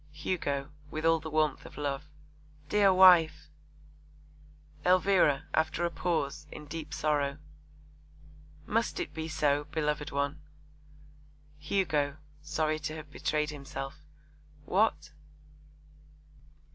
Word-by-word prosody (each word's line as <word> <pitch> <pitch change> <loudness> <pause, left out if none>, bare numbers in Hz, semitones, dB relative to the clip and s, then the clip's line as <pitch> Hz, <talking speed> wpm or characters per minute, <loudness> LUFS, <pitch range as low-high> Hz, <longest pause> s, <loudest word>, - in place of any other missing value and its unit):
HUGO 145 -3 -2 0.2
(with 155 +2 -4
all 165 0 +4
the 160 0 -7
warmth 155 -2 +1
of - - -12
love). 145 -1 -2 0.6
Dear 205 0 +5
wife! 180 -4 +6 1.3
ELVIRA 185 -6 +4
(after 160 +2 +1
a 170 - -1
pause, 155 -4 -2
in 150 - -9
deep 150 0 -7
sorrow). 145 -2 0 1.3
Must 230 +2 0
it - - -4
be 160 0 -4
so, 145 -2 +1
beloved 150 -1 -2
one? 140 +2 -2 1.2
HUGO 145 -3 0 0.2
(sorry 155 +1 -1
to 155 +1 -4
have 155 -2 -9
betrayed 150 +1 -1
himself). 135 -1 -7 0.7
What? 215 +4 +1
155 Hz, 105 wpm, -30 LUFS, 145-165 Hz, 1.3 s, wife